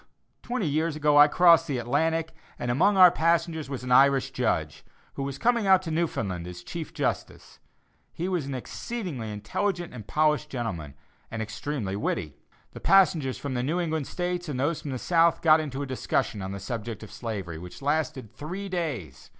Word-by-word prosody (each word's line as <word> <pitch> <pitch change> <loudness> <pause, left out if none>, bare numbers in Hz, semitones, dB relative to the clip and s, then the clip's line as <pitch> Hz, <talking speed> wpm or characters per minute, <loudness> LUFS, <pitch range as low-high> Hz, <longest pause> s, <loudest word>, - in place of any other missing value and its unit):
Twenty 245 -5 -2
years 155 +1 0
ago 150 -1 +4
I 145 - +9
crossed 165 +1 +5
the 140 -4 -1
Atlantic, 160 +7 0 0.2
and 120 - -2
among 185 +10 +3
our 180 -2 +9
passengers 165 -2 0
was 135 -3 -5
an 125 - -4
Irish 135 +1 +5
judge, - - -1 0.3
who - - -5
was 135 0 -3
coming 235 0 +2
out 190 -1 +5
to 165 - -4
Newfoundland 100 - -2
as 90 0 -9
chief 165 - -6
justice. - - -4 0.5
He 175 - -4
was 175 -7 -1
an 140 - -4
exceedingly 140 - -5
intelligent 175 - -2
and 110 -5 -9
polished 150 0 +1
gentleman, 90 - -4 0.3
and 115 - -5
extremely 110 -1 -3
witty. 90 -6 -2 0.4
The - - -10
passengers 170 -9 +3
from 140 -2 -5
the 125 - -1
New 155 +8 -1
England 160 -4 -2
States 180 -1 -3
and 130 -4 -3
those 155 +3 0
from 150 - -6
the 130 - -3
South 165 +4 +2
got 160 -1 +6
into 145 -3 -4
a - - -3
discussion 130 -5 -1
on 95 0 -4
the 100 - -5
subject 115 +2 -5
of 110 - -11
slavery, 95 -9 -5
which 90 +9 -10
lasted 145 -5 -1
three 185 +7 -6
days. 140 - -4
145 Hz, 185 wpm, -27 LUFS, 120-170 Hz, 0.5 s, I